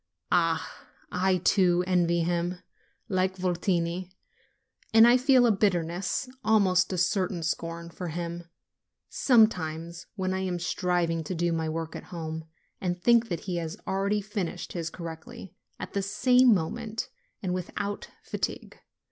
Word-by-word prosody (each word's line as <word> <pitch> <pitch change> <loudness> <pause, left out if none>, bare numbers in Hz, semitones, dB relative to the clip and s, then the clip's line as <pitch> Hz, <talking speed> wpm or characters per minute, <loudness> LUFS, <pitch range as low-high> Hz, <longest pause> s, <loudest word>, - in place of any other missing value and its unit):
Ah! 165 -2 0 0.2
I, 185 +1 +2
too, 180 -1 +3
envy 175 -2 +2
him, 175 +1 -1 0.5
like 190 -2 0
Votini. 180 0 -1 0.9
And 225 +1 +9
I 240 - +7
feel 255 -1 +5
a 235 - +5
bitterness, 180 +1 0 0.2
almost 190 -4 +3
a 185 - -2
certain 180 -1 0
scorn, 165 +1 -3
for 180 +1 -6
him, 170 +1 -4 0.6
sometimes, 170 - +2
when 185 -2 -1
I 190 - -1
am 185 -2 -1
striving 175 -1 0
to 185 - -3
do 170 +1 +1
my 160 -1 -1
work 160 0 -4
at - - -7
home, 160 -2 -6 0.4
and 180 -1 -1
think 235 +4 +4
that 170 -3 -2
he 180 -2 -3
has 165 +3 -4
already 200 +2 0
finished 200 -4 -4
his 165 -2 -3
correctly, 165 +1 -9 0.3
at - - -7
this 200 0 -1
same 250 +3 +5
moment, 215 +5 -1 0.3
and 180 -2 -1
without 200 +3 -4 0.2
fatigue. - - -4
180 Hz, 140 wpm, -28 LUFS, 170-200 Hz, 0.9 s, And